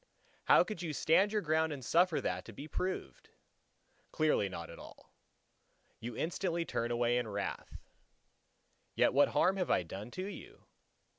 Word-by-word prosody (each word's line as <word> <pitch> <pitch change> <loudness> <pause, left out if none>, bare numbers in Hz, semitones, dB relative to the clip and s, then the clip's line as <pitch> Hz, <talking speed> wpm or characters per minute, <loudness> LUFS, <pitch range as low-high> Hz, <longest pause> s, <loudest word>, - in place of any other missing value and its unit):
How - - +7
could 215 -5 -6
you 165 -3 -3
stand 165 +9 +3
your 210 -1 0
ground 160 0 +1
and 135 -4 -6
suffer 175 +2 +3
that 90 0 -2
to 115 - -10
be 140 +9 -8
proved? 185 +4 -4 0.8
Clearly 150 -10 +2
not 85 -3 -7
at - - -11
all. - - -14 0.9
You 115 0 -6
instantly 170 0 -1
turn 115 -6 -2
away 120 0 +2
in 120 - -3
wrath. 100 -1 -4 1.2
Yet - - +3
what 145 +2 +5
harm 190 +2 +2
have 185 - -1
I - - +3
done 95 +6 -7
to 185 +9 -5
you? 205 - -10
150 Hz, 160 wpm, -33 LUFS, 115-175 Hz, 1.2 s, How